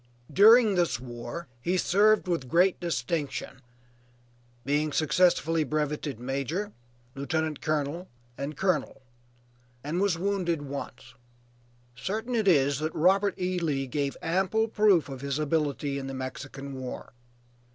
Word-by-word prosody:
During 220 - +7
this 175 -8 +1
war 120 +6 -7
he 180 +8 0
served 205 +3 +3
with 165 -7 -1
great 180 +5 +3
distinction, 145 -4 -3 1.0
being 150 +2 +1
successively 165 +1 +2
breveted 150 -2 -2
major, 140 - -3 0.4
lieutenant 155 +2 -2
colonel 155 +3 -2 0.3
and 140 +2 -5
colonel, 185 -7 -1 0.8
and 160 +6 -2
was 200 -4 +2
wounded 175 -4 -1
once; 140 -2 -7 0.8
certain 220 - -3
it 220 -4 +1
is 140 -5 +4
that 155 +1 -3
Robert 195 +4 +3
E. 180 0 -1
Lee 145 -5 -1
gave 140 +1 -2
ample 190 +6 +1
proof 210 -6 +3
of 135 -2 -8
his 140 0 -2
ability 145 -2 -1
in 135 - -6
the 135 - -5
Mexican 135 +1 -6
war. 130 -1 -7
155 Hz, 125 wpm, -28 LUFS, 140-185 Hz, 1.0 s, During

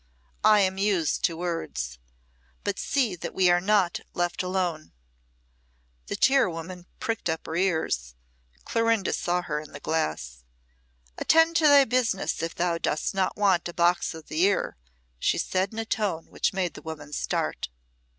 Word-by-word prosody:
I 210 -1 +6
am 190 0 +1
used 195 -6 +1
to 165 - -1
words. 165 - -4 0.6
But - - -2
see 250 -9 0
that - - -6
we 185 -2 +4
are 175 0 +3
not 190 -2 +2 0.2
left 175 0 -1
alone." 180 -4 -2 1.1
The - - -3
tirewoman 180 -9 +1
pricked 225 -7 -2
up 160 0 -2
her 160 - -5
ears. 160 - 0 0.5
Clorinda 230 -3 +1
saw 175 0 0
her 150 -3 -2
in 150 -1 -11
the - - -7
glass. 65 - -2 0.8
"Attend 325 +1 +4
to 315 - +5
thy 285 -1 +7
business 230 -9 0
if 165 0 -3
thou 170 -1 0
dost 155 - -1
not 190 -1 0
want 190 -4 +2
a - - -8
box 175 -1 +2
o' 160 - -8
the 155 +2 -3
ear," 195 +1 +2 0.4
she - - +1
said 190 +1 0
in 220 - -10
a 225 - -2
tone 200 -7 -2
which - - 0
made 185 -3 -1
the - - -10
woman 150 -2 -8
start. - - -2
180 Hz, 160 wpm, -26 LUFS, 160-205 Hz, 1.1 s, thy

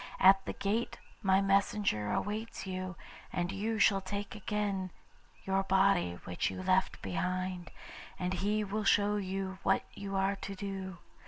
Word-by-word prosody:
At 195 +1 +7
the - - -2
gate 220 +4 -1 0.2
my 190 -2 +4
messenger 195 - +2
awaits 215 +1 -2
you, 185 -1 -4 0.4
and 175 +1 -1
you 215 +3 -1
shall 200 -1 +5
take 200 +2 -4
again 205 -3 -1 0.6
your 195 0 +2
body 190 - +3
which 90 - -1
you 185 - -5
left 185 0 +2
behind, 180 - -2 0.5
and 180 +1 -1
he 205 +4 +1
will 210 +2 -2
show 205 +1 +4
you 190 -1 -3
what 195 - +2
you 200 -1 -5
are 195 +1 +2
to 195 0 -6
do. 190 -2 -5
195 Hz, 150 wpm, -32 LUFS, 185-200 Hz, 0.6 s, At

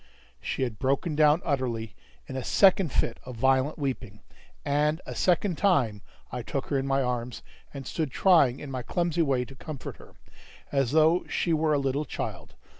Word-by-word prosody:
She - - -2
had 120 -5 -4
broken 140 +4 0
down 150 +2 +4
utterly 120 - -2 0.3
in - - -8
a 130 - -3
second 190 +1 +4
fit 115 - 0
of 125 -1 -8
violent 130 +4 +2
weeping; 130 -8 -4 0.4
and 150 +2 +1
a - - -6
second 180 -1 +1
time 125 - +2 0.3
I 125 - -4
took 135 +3 -4
her 140 - +1
in 135 - -3
my 135 0 +2
arms, 125 -1 -3 0.3
and 135 -2 -8
stood 155 +3 -2
trying 140 -5 +4
in 145 - -7
my 130 -1 -3
clumsy 170 +5 -1
way 135 -5 +1
to 135 - -12
comfort 140 +1 -8
her, - - -16 0.6
as 135 -2 +1
though 160 +3 +4
she 170 - 0
were 155 0 +2
a - - +3
little 140 +2 -1
child. - - -6
140 Hz, 185 wpm, -27 LUFS, 125-155 Hz, 0.6 s, down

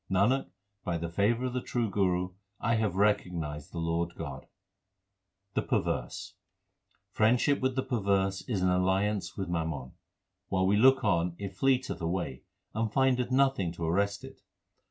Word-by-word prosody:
Nanak, 105 +8 +2 0.3
by 85 -1 -1
the 85 0 -4
favour 110 +7 +1
of 125 - -2
the 125 - -1
true 120 -2 -1
Guru 90 -2 0 0.3
I 115 - +1
have 110 -5 +1
recognized 85 -7 0
the - - -7
Lord 85 +1 -1
God. 70 -5 -7 1.1
The - - +1
perverse: - - -2 0.8
Friendship 125 +6 +3
with 130 -1 0
the 130 - 0
perverse 95 -4 0
is 100 -6 0
an 95 - +3
alliance 95 +3 +1
with 95 -2 -2
mammon: 80 -6 -3 0.6
While 95 -1 +1
we 100 +2 +3
look 130 +5 +5
on, 90 -4 +1
it 100 -2 -6
fleeth 130 +2 +2
away, 85 -6 -2 0.3
and 110 0 -1
findeth 125 -2 +2
nothing 130 -9 +2
to 85 -1 -4
arrest 100 +5 0
it. - - -11
95 Hz, 155 wpm, -30 LUFS, 85-115 Hz, 1.1 s, look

